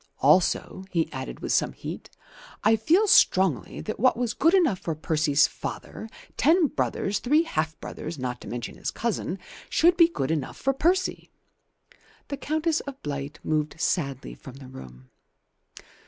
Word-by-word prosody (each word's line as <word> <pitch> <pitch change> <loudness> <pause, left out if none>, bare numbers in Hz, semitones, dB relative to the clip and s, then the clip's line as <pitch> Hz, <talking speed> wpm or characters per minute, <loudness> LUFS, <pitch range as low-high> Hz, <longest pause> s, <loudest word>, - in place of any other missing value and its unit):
Also," 175 +5 +2
he 165 -4 -1
added - - -6
with - - -3
some - - +1
heat, - - -8 0.5
"I 225 - +5
feel 330 - +3
strongly 185 - +3
that 215 - -5
what 255 +2 +3
was 240 -2 -1
good 330 +6 +3
enough 310 - +3
for 165 - -3
Percy's 155 -2 +2
father, 220 - -7 0.3
ten 330 +4 +4
brothers, 205 -8 -1
three 300 +6 +3
half 155 - -2
brothers, 160 +1 -7
not 125 -2 -4
to - - -10
mention 120 -1 -6
his - - -3
cousin, 215 -5 -2 0.3
should 345 +2 +4
be 335 -2 +7
good 160 - -3
enough 150 -4 -3
for 270 - 0
Percy." 360 +7 0 1.0
The 280 - -3
Countess 315 +3 0
of 275 -1 -8
Blight 140 0 -5
moved 155 0 -1
sadly 140 -8 -1
from 130 - -12
the 135 -2 -12
room. 65 - -12
185 Hz, 155 wpm, -26 LUFS, -, 1.0 s, be